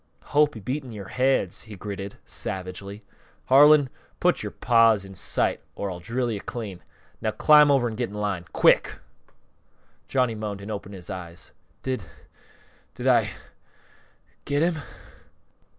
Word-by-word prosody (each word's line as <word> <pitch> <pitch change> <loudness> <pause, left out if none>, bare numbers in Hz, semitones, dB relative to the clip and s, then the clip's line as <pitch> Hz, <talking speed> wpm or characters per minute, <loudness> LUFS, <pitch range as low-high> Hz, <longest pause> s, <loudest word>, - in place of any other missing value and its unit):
"Hope 150 -1 +4
he - - -6
beat 130 +8 -3
in 125 - -10
yore 100 -3 -8
heads!" 130 -8 +1
he 110 -2 -9
gritted, 100 0 -6
savagely. 95 +2 -5 0.5
"Harlan, 145 +1 +7 0.3
put - - +2
yore - - -3
paws 115 -4 +3
up - - -11
in - - -10
sight 95 - -1
or 100 -1 -3
I'll 90 - -6
drill 120 +6 -2
you 105 -3 -4
clean! 105 -7 -6 0.4
Now 110 - 0
climb 150 +6 +6
over 135 -4 +3
an' 115 - -4
get 120 +1 -2
in 105 - -10
line 100 -4 -2
quick!" - - +4 1.1
Johnny 125 -3 +1
moaned 105 -2 -5
and 100 +2 -7
opened 100 -1 -6
his 90 0 -8
eyes. 90 -1 -8 0.3
"Did 130 -1 -2 0.9
did - - -6
I - - +4 1.2
get 145 +2 +1
him?" 170 -2 +1
110 Hz, 150 wpm, -25 LUFS, 100-130 Hz, 1.2 s, Harlan